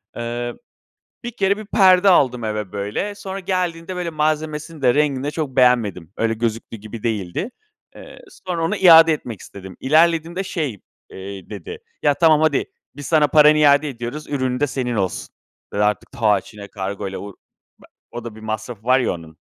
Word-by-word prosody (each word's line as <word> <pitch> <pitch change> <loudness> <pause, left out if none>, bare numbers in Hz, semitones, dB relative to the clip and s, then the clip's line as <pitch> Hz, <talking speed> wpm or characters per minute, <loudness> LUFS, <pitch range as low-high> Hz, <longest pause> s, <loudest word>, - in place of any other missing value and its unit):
Eee, 120 +1 -4 0.7
bir 240 - -3
kere, 200 -1 +2
1 215 0 -9
perde 190 -1 +5
aldım 125 -9 +3
eve 105 -2 -3
böyle. 105 - -3
Sonra 195 -1 -6
geldiğinde 180 -1 -2
böyle 175 -1 -3
malzemesini 155 0 -2
de, 125 -2 +4
rengini 145 -3 +1
de 145 - -1
çok 150 -4 -4
beğenmedim. 115 -9 +2
Öyle, 115 0 0
gözüktüğü 115 0 -3
gibi 110 +1 -10
değildi. 110 - -2 0.5
Eee, - - -12 0.3
sonra 175 -2 -2
onu 165 - 0
iade 165 -3 +8
etmek 120 -8 -5
istedim. 95 -2 -11
İlerlediğimde 165 +5 +2
şey, 150 - -3 0.3
eee, 95 0 -9
dedi 440 +1 -7 0.2
“yaa, 145 - +3
tamam, 155 -1 +4
hadi. 155 -3 +2 0.3
Biz 145 -2 -7
sana 155 -2 +4
paranı 150 +1 +6
iade 145 0 +4
ediyoruz, 125 +3 -6
ürünün 130 -3 -1
de 145 - +3
senin 130 -3 -3
olsun.“ 95 -3 -2 0.5
Eee, - - -2
artık, 105 0 0
taa, 105 -4 +2
Çin'e 100 +1 -12
kargoyla 95 -1 -5
o 100 - -7 0.5
be - - -19 0.3
o 120 - -7
da 115 -2 -7
bir 110 - -12
masrafı 110 0 -6
var 130 +2 +4
ya 125 - 0
onun. 80 -2 -10
130 Hz, 175 wpm, -20 LUFS, 110-160 Hz, 0.7 s, iade